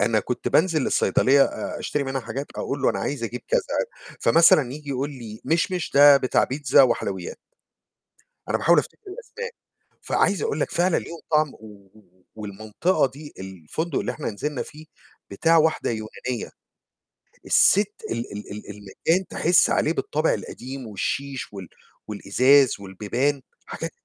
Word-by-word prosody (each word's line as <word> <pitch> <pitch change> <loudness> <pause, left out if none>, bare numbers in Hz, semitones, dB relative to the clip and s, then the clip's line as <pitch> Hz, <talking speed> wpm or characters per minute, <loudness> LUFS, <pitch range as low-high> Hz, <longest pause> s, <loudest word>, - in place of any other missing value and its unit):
أنا 110 +1 +2
كنت 125 - -3
بانزل 160 -4 +2
الصيدلية 140 +1 +3
أ - - -5
أشتري 145 -1 -2
منها 135 0 -3
حاجات، 135 +4 -5
أقول - - -3
له - - +4
أنا - - -3
عايز 135 -5 -3
أجيب 120 +2 -5
كذا، - - +3 0.6
فمثلًا 140 -1 +5
ييجي 145 0 -9
يقول 135 +2 -2
لي 115 -5 -9
مشمش 175 +1 0
ده 145 0 +8
بتاع 130 -2 +2
بيتزا 135 0 +3
وحلويات. 100 -7 -1 1.1
أنا - - +1
باحاول - - +4
أفتكر - - -3
الأسماء، 470 +1 -7 0.5
فعايز - - +1
أقول 450 -1 -1
لك - - -1
فعلًا 175 0 +2
ليهم 170 - -8
طعم، 150 -2 +2
و 100 -3 -15 0.5
والمنطقة 110 - -1
دي، 145 +2 -11
الفندق 95 - -4
اللي - - -2
إحنا 150 - -4
نزلنا 145 +6 -3
فيه، 155 0 -12 0.5
بتاع 165 0 +3
واحدة 160 0 +2
يونانية. 115 +2 -5 1.0
الست 205 +1 +4 0.2
ال 115 +1 -4
ال 105 +1 -8
ال 105 +1 -8
المكان 105 - -1
تحس 175 +2 +3
عليه 160 - +1
بالطابع 155 -1 0
القديم 130 0 -7
والشيش 135 +6 -4
وال 95 -4 -8 0.4
والإزاز 125 +6 +3
والبيبان، 115 +9 -2 0.2
حاجات - - -6
135 Hz, 145 wpm, -24 LUFS, 110-155 Hz, 1.1 s, ده